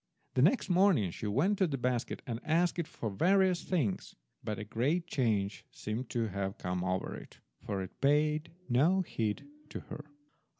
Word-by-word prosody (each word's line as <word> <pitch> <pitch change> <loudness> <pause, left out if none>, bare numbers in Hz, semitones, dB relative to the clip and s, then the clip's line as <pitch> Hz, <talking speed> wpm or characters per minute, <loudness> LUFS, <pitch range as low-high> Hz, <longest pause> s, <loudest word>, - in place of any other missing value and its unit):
The 125 - +2
next 190 - +4
morning 180 - +4
she 105 - -5
went 160 - +2
to 190 - +4
the 140 -3 -2
basket 125 -1 -1
and 115 -4 -3
asked 170 +3 +2
it 165 - -1
for 110 - -4
various 185 - +3
things, 140 - -1 0.3
but 105 -1 -3
a 105 - -4
great 135 - 0
change 110 - 0
seemed 115 +4 -5
to 115 -2 -1
have 95 0 -3
come 90 0 -2
over 95 0 -1
it, - - -11 0.3
for 100 -2 -2
it 95 - -11
paid 150 +2 +2 0.2
no 155 +10 +4
heed 115 - -2 0.2
to - - -5
her. 150 - -8
125 Hz, 175 wpm, -32 LUFS, 105-170 Hz, 0.3 s, next